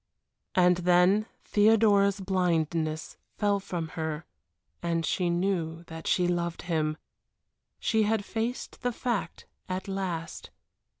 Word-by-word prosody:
And 180 Hz, -1 st, +5 dB
then 180 Hz, +4 st, +4 dB, 0.2 s
Theodora's 205 Hz, -2 st, +4 dB
blindness 165 Hz, -4 st, 0 dB, 0.2 s
fell 205 Hz, -1 st, +2 dB
from 175 Hz, -4 st, -4 dB
her 160 Hz, -1 st, -4 dB, 0.6 s
and 165 Hz, -1 st, 0 dB
she 180 Hz, +2 st, 0 dB
knew 170 Hz, -2 st, -1 dB
that 160 Hz, -1 st, -8 dB
she 180 Hz, -1 st, +3 dB
loved 170 Hz, -1 st, -1 dB
him 155 Hz, -3 st, 0 dB, 0.8 s
she 220 Hz, -1 st, +2 dB
had 215 Hz, -1 st, +1 dB
faced 230 Hz, +4 st, -3 dB
the 245 Hz, -1 st, 0 dB
fact 215 Hz, -9 st, -3 dB, 0.2 s
at 185 Hz, +1 st, -3 dB
last. 185 Hz, -4 st, -4 dB
180 Hz, 115 wpm, -28 LUFS, 165-200 Hz, 0.8 s, And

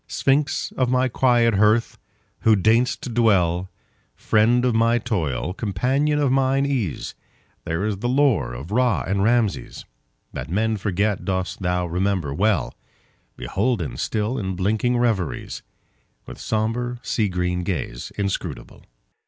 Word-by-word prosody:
Sphinx 140 Hz, +1 st, 0 dB
of 130 Hz, -2 st, +1 dB
my 130 Hz, +1 st, +2 dB
quiet 120 Hz, -2 st, +3 dB
hearth! 105 Hz, +3 st, +2 dB, 0.4 s
who 110 Hz, -1 st, +4 dB
deign'st 115 Hz, +5 st, +2 dB
to -, -, -5 dB
dwellFriend 110 Hz, +3 st, +1 dB
of 125 Hz, -2 st, +2 dB
my 115 Hz, +1 st, +3 dB
toil, 90 Hz, -, -2 dB
companion 130 Hz, +10 st, 0 dB
of 145 Hz, -3 st, +2 dB
mine 135 Hz, +1 st, +2 dB
ease, 120 Hz, -, -2 dB, 0.5 s
Thine 85 Hz, +2 st, -2 dB
is 105 Hz, -2 st, -1 dB
the 120 Hz, +5 st, -2 dB
lore 130 Hz, -, +2 dB
of 70 Hz, +10 st, -8 dB
Ra 115 Hz, -, +2 dB
and 95 Hz, +3 st, 0 dB
Rameses; 110 Hz, -, 0 dB, 0.5 s
That -, -, -6 dB
men 110 Hz, +4 st, 0 dB
forget 100 Hz, +1 st, -1 dB
dost 95 Hz, 0 st, -3 dB
thou 90 Hz, -1 st, 0 dB
remember 90 Hz, -3 st, -1 dB
well, 100 Hz, +5 st, +1 dB, 0.6 s
Beholden 105 Hz, -, -1 dB
still 110 Hz, +4 st, -2 dB
in 95 Hz, -3 st, -3 dB
blinking 110 Hz, +6 st, 0 dB
reveriesWith 110 Hz, -9 st, -1 dB, 0.8 s
sombre, 115 Hz, +3 st, -2 dB
sea 105 Hz, -4 st, 0 dB
green 90 Hz, 0 st, -1 dB
gaze 80 Hz, -10 st, -4 dB
inscrutable. 100 Hz, -11 st, -4 dB
110 Hz, 130 wpm, -22 LUFS, 95-120 Hz, 0.8 s, who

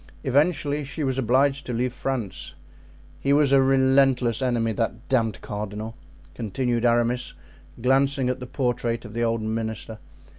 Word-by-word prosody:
Eventually 145 Hz, +1 st, +1 dB
she 140 Hz, +3 st, -4 dB
was 135 Hz, -1 st, 0 dB
obliged 135 Hz, +3 st, +2 dB
to 125 Hz, -, -3 dB
leave 120 Hz, +1 st, -1 dB
France. 125 Hz, -6 st, -4 dB, 0.6 s
He 140 Hz, -, +1 dB
was 145 Hz, -1 st, +4 dB
a 135 Hz, -1 st, +6 dB
relentless 130 Hz, -2 st, +3 dB
enemy, 120 Hz, -3 st, +1 dB
that 115 Hz, +2 st, -3 dB
damned 115 Hz, -6 st, +1 dB
cardinal," 105 Hz, +2 st, -5 dB, 0.4 s
continued 120 Hz, +2 st, -1 dB
Aramis, 120 Hz, +1 st, +1 dB, 0.4 s
glancing 135 Hz, +2 st, +2 dB
at 125 Hz, +1 st, -1 dB
the 125 Hz, -, -7 dB
portrait 120 Hz, -3 st, -1 dB
of 105 Hz, -, -9 dB
the 120 Hz, +1 st, -1 dB
old 115 Hz, -1 st, 0 dB
minister. 110 Hz, 0 st, -4 dB
125 Hz, 145 wpm, -24 LUFS, 115-135 Hz, 0.6 s, a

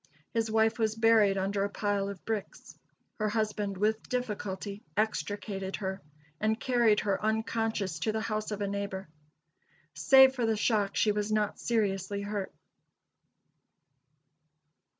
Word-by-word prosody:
His 225 Hz, -1 st, 0 dB
wife 220 Hz, +1 st, +2 dB
was 220 Hz, -1 st, +1 dB
buried 225 Hz, -3 st, +4 dB
under 195 Hz, +1 st, 0 dB
a 200 Hz, -, -1 dB
pile 205 Hz, -1 st, -1 dB
of 200 Hz, -3 st, -9 dB
bricks. 220 Hz, -3 st, -5 dB, 0.4 s
Her 215 Hz, 0 st, +1 dB
husband 210 Hz, -2 st, -1 dB
with 215 Hz, +3 st, 0 dB
difficulty 205 Hz, -4 st, -3 dB, 0.2 s
extricated 200 Hz, -1 st, -2 dB
her, 190 Hz, -1 st, -4 dB, 0.4 s
and 220 Hz, +1 st, +1 dB
carried 235 Hz, -4 st, +3 dB
her 200 Hz, 0 st, -1 dB
unconscious 220 Hz, -4 st, -1 dB
to 220 Hz, -, 0 dB
the 220 Hz, 0 st, -2 dB
house 215 Hz, -1 st, -2 dB
of 210 Hz, -1 st, -4 dB
a 200 Hz, -, 0 dB
neighbor. 200 Hz, -1 st, -4 dB, 0.9 s
Save 265 Hz, -1 st, +6 dB
for 245 Hz, -3 st, -1 dB
the 220 Hz, -1 st, +1 dB
shock, 210 Hz, -2 st, +1 dB
she 215 Hz, -, +3 dB
was 210 Hz, +1 st, -2 dB
not 210 Hz, -1 st, 0 dB
seriously 200 Hz, -3 st, -1 dB
hurt. 205 Hz, -1 st, -3 dB
210 Hz, 135 wpm, -30 LUFS, 200-220 Hz, 0.9 s, Save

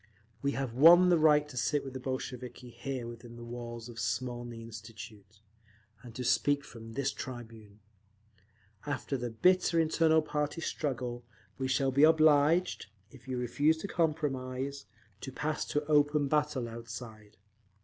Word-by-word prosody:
We 140 Hz, 0 st, 0 dB
have 135 Hz, -3 st, -3 dB
won 170 Hz, +7 st, +8 dB
the 175 Hz, -, +5 dB
right 150 Hz, -1 st, +5 dB
to 145 Hz, -, -12 dB
sit 145 Hz, +4 st, 0 dB
with 135 Hz, -, -7 dB
the 130 Hz, -, -5 dB
Bolsheviki 125 Hz, -1 st, -6 dB
here 125 Hz, +1 st, -5 dB
within 120 Hz, 0 st, -10 dB
the 120 Hz, -, -10 dB
walls 120 Hz, -1 st, -7 dB
of 115 Hz, -1 st, -9 dB
Smolny 120 Hz, +1 st, -3 dB
Institute, 110 Hz, -2 st, -11 dB, 0.6 s
and 120 Hz, -2 st, -12 dB
to 125 Hz, -, -4 dB
speak 130 Hz, +4 st, +2 dB
from 115 Hz, -1 st, -11 dB
this 140 Hz, +2 st, -1 dB
tribune. 110 Hz, -5 st, -9 dB, 1.1 s
After 140 Hz, -1 st, -2 dB
the 120 Hz, -2 st, -3 dB
bitter 180 Hz, +8 st, +3 dB
internal 160 Hz, 0 st, +3 dB
party 150 Hz, +1 st, -2 dB
struggle, 125 Hz, -6 st, -3 dB, 0.4 s
we 130 Hz, -, -1 dB
shall 135 Hz, +1 st, +1 dB
be 140 Hz, +2 st, +2 dB
obliged, 155 Hz, +2 st, +4 dB, 0.2 s
if 135 Hz, -1 st, -16 dB
you 130 Hz, -1 st, -3 dB
refuse 145 Hz, +6 st, +2 dB
to 180 Hz, -, -5 dB
compromise, 140 Hz, -5 st, -2 dB, 0.3 s
to 135 Hz, -, -7 dB
pass 150 Hz, +3 st, -2 dB
to 150 Hz, 0 st, -2 dB
open 145 Hz, -1 st, +3 dB
battle 150 Hz, -4 st, 0 dB
outside…. 115 Hz, -2 st, -9 dB
130 Hz, 150 wpm, -31 LUFS, 120-150 Hz, 1.1 s, won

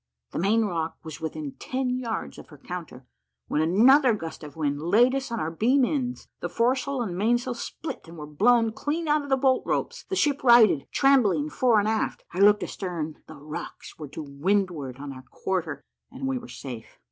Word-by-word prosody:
The -, -, -3 dB
main 215 Hz, +5 st, +3 dB
rock 165 Hz, -4 st, -3 dB
was 160 Hz, -1 st, -8 dB
within 280 Hz, -, -4 dB
ten 255 Hz, -1 st, -2 dB
yards 230 Hz, -3 st, -4 dB
of -, -, -12 dB
her 150 Hz, -, -14 dB
counter, 160 Hz, -4 st, -8 dB, 0.4 s
when 150 Hz, -, 0 dB
another 235 Hz, -, +5 dB
gust 165 Hz, -5 st, -7 dB
of 150 Hz, -2 st, -10 dB
wind 145 Hz, -2 st, -1 dB
laid 220 Hz, +10 st, +4 dB
us 270 Hz, -2 st, -3 dB
on 230 Hz, -, -2 dB
our 160 Hz, -, -2 dB
beam 250 Hz, +10 st, +3 dB
ends; 250 Hz, -3 st, -3 dB
the -, -, -4 dB
foresail 255 Hz, +2 st, 0 dB
and 185 Hz, -6 st, -4 dB
mainsail 240 Hz, +6 st, +1 dB
split, 265 Hz, -, -7 dB
and 165 Hz, +1 st, -11 dB
were 150 Hz, -, -6 dB
blown 225 Hz, +9 st, +3 dB
clean 310 Hz, +7 st, -3 dB
out 300 Hz, 0 st, +3 dB
of 285 Hz, -, -8 dB
the 270 Hz, -, +3 dB
bolt 260 Hz, -1 st, +3 dB
ropes -, -, -2 dB
the 385 Hz, -, -3 dB
ship 290 Hz, -6 st, +1 dB
righted, 235 Hz, -, +6 dB
trembling 205 Hz, -, +3 dB
fore 240 Hz, +2 st, +3 dB
and 205 Hz, 0 st, +2 dB
aft. 220 Hz, 0 st, -1 dB
I 180 Hz, -, -4 dB
looked 205 Hz, +1 st, +6 dB
astern: 165 Hz, -5 st, -5 dB
the 155 Hz, -, -10 dB
rocks 150 Hz, +2 st, -8 dB
were 150 Hz, -, -6 dB
to 150 Hz, +3 st, -7 dB
windward 150 Hz, -2 st, -1 dB
on 140 Hz, 0 st, -7 dB
our 130 Hz, -, -10 dB
quarter, 170 Hz, -7 st, -3 dB, 0.3 s
and 265 Hz, +1 st, -6 dB
we 265 Hz, -1 st, -1 dB
were 240 Hz, -, -11 dB
safe. 120 Hz, -5 st, -9 dB
210 Hz, 200 wpm, -26 LUFS, 160-255 Hz, 0.4 s, righted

